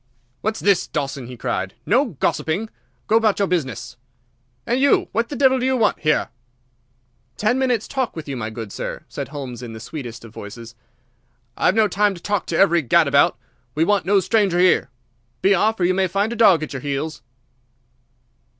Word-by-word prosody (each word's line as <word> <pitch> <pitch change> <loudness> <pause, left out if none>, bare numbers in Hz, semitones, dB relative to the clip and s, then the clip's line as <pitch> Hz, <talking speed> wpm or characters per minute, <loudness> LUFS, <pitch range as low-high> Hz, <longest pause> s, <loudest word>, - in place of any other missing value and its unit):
"What's 220 +1 -2
this, 200 -3 +2
Dawson!" 135 -3 -4
he 125 0 -9
cried. 95 -3 -3
"No 250 +8 +3
gossiping! 190 - -2 0.3
Go 220 - +3
about 220 -3 +2
your 200 - +1
business! 125 -8 -3 0.7
And 245 - 0
you, 280 +1 +3
what 230 +1 -1
the 290 - -5
devil 265 0 +4
do 250 - -1
you 260 0 +2
want 220 -3 +2
here?" 155 -1 +1 1.1
"Ten 230 +5 +1
minutes' 250 -5 0
talk 260 -3 -2
with 160 -2 -7
you, 140 - -4
my 110 -3 -4
good 110 -2 -7
sir," - - -5
said - - -6
Holmes 135 -5 -7
in 120 -2 -7
the 110 - -8
sweetest 115 -2 -8
of 115 - -13
voices. 115 +3 -9 0.8
"I've 185 - +2
no 220 -1 +4
time 205 0 +1
to - - -10
talk 205 -4 -1
to 165 - -1
every 170 -3 +4
gadabout. 130 - +3 0.4
We 155 - +2
want 200 -3 +1
no 200 0 +4
strangers 195 -3 +2
here. 180 -8 +3 0.5
Be 195 - +5
off, 215 +3 +1
or 175 - +2
you 185 - +3
may 190 0 +1
find 200 +5 -1
a - - -5
dog 195 -9 +5
at 155 - -6
your 135 - -5
heels." 145 -2 -3
180 Hz, 190 wpm, -21 LUFS, 135-220 Hz, 1.1 s, Be